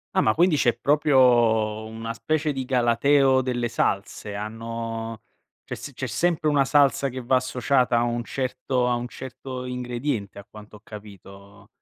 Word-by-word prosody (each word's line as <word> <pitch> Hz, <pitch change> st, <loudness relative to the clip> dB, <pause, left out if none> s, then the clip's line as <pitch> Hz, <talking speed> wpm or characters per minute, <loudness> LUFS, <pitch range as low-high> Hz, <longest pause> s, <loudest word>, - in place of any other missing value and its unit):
Ah, -, -, +4 dB
ma 110 Hz, -, +3 dB
quindi 170 Hz, -2 st, +3 dB
c'è 120 Hz, -4 st, +2 dB
proprio, 120 Hz, -6 st, +3 dB
mhmm, 110 Hz, -, -10 dB
una 115 Hz, 0 st, -4 dB
specie 155 Hz, +5 st, -1 dB
di 135 Hz, -2 st, -4 dB
galateo 130 Hz, +2 st, +3 dB
delle 120 Hz, -2 st, -2 dB
salse. 100 Hz, 0 st, -2 dB
Hanno 115 Hz, +1 st, -5 dB, 0.4 s
c'è -, -, -7 dB
s 145 Hz, -, -9 dB
c'è 135 Hz, -, -5 dB
sempre 155 Hz, +5 st, 0 dB
una 140 Hz, -2 st, +3 dB
salsa 140 Hz, -1 st, +3 dB
che 130 Hz, 0 st, -5 dB
va 130 Hz, +2 st, +3 dB
associata 125 Hz, -1 st, +1 dB
a -, -, +3 dB
un 120 Hz, 0 st, -1 dB
certo 130 Hz, -1 st, -1 dB
a 120 Hz, -, +1 dB
un 120 Hz, 0 st, -4 dB
certo 130 Hz, +1 st, -8 dB
ingrediente 125 Hz, -4 st, -4 dB
a 100 Hz, -, -9 dB
quanto 105 Hz, +1 st, -14 dB
ho 105 Hz, -, -15 dB
capito? 100 Hz, -1 st, -13 dB
120 Hz, 170 wpm, -24 LUFS, 110-135 Hz, 0.4 s, Ah